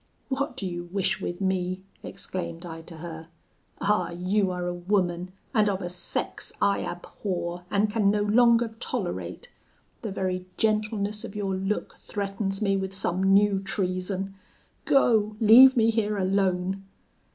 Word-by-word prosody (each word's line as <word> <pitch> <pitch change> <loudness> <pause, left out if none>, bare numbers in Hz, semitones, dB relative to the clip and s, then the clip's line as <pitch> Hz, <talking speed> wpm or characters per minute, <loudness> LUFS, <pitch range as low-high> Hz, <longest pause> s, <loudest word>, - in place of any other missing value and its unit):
'What 270 -1 -2
do 200 - -3
you 175 -1 -4
wish 190 +1 -1
with 175 +1 -4
me?' 185 -1 -1 0.2
exclaimed 170 -1 -5
I 165 -1 -7
to 165 0 -11
her. 160 0 -8 0.5
'Ah! 210 +1 +2
you 185 +3 0
are 180 -1 -3
a 175 - -1
woman, 180 -1 0 0.2
and 215 -3 +4
of 195 -1 -2
a 175 - -3
sex 180 0 -3
I 200 0 +3
abhor, 175 -1 -4
and 205 +1 +2
can 210 -1 +2
no 205 0 +2
longer 235 +2 +4
tolerate; 95 - -4 0.5
the 220 - -4
very 185 -1 -2
gentleness 215 -1 0
of - - -8
your 200 -2 -1
look 195 +2 -2
threatens 195 0 -2
me 195 -1 +2
with 190 0 -3
some 185 -1 0
new 195 +1 +4
treason. 195 -1 -2 0.5
Go, 220 -6 +3
leave 250 +4 +8
me 225 0 +5
here 215 -2 0
alone!' 190 0 0
195 Hz, 150 wpm, -26 LUFS, 180-210 Hz, 0.5 s, leave